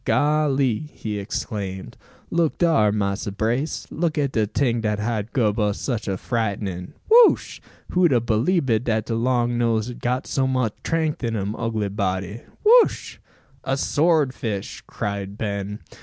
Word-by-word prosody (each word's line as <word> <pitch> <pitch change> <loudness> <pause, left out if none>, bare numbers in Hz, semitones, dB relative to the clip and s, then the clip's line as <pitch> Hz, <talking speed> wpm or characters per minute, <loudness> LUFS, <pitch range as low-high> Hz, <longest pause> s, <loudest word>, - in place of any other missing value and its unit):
"Golly!" 145 -3 +1
he 105 -2 -5
exclaimed. 100 -1 -5 0.4
"Look 170 -2 +1
dar, 135 -12 +3
Massa 100 -1 -1
Brace. 115 +9 -1
Look 160 -1 -1
at 140 -2 +1
de 110 -4 +1
ting 120 0 0
dat 105 -1 0
hab 110 0 -2
gub 110 -4 +1
us 105 -1 0
sich 115 -5 -3
a 95 -1 -1
frightnin. 100 -5 -3
Whuch! 465 +1 +5 0.3
Who'd 180 -3 +3
a 125 - +4
beliebed 120 - +1
dat 110 -2 0
de 115 - -3
long 120 0 +1
nose 115 -1 +1
had 125 - -9
got 125 +1 -1
so 135 -1 0
much 130 -5 0
'trength 160 -3 -1
in 115 -1 -1
im 100 +1 -2
ugly 110 -3 -2
body? 95 +1 -2 0.2
Whuch!" 470 +2 +4 0.4
"A 135 +1 -1
sword 150 -2 +2
fish!" 105 -5 -4
cried 100 -1 -4
Ben. 100 -1 -3
115 Hz, 155 wpm, -23 LUFS, 105-135 Hz, 0.4 s, Whuch